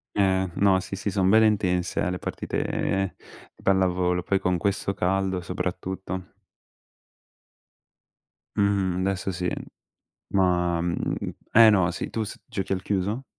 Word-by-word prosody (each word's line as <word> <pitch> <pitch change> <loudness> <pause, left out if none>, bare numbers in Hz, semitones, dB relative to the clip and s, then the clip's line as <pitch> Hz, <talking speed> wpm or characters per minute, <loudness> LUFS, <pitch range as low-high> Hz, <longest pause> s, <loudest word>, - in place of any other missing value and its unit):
Ehm, 95 -2 +2
no, 100 -2 +4
sì, 95 +1 -6
sì, 100 +1 -3
son 95 -1 +1
belle 110 +3 +6
intense, 90 -4 0
eh, - - +1
le 90 - -4
partite 95 -1 -2 0.4
di - - -21
pallavolo. 90 -2 +2
Poi 95 +2 +1
con 90 -1 +1
questo 100 +1 0
caldo 95 -1 0
soprattutto. 95 +1 -4 2.2
Mh-mh, 95 -3 +1
adesso 95 0 -1
sì. 90 0 -2 0.8
Ma, 90 -3 +2
mhmm 85 0 -1 0.4
eh, 115 0 +8
no. 95 -5 +3
Sì, - - -4
tu 110 - -2
s 105 - -7
giochi 95 -1 -3
al 95 -1 -1
chiuso? 100 +6 -1
95 Hz, 135 wpm, -25 LUFS, 90-100 Hz, 2.2 s, eh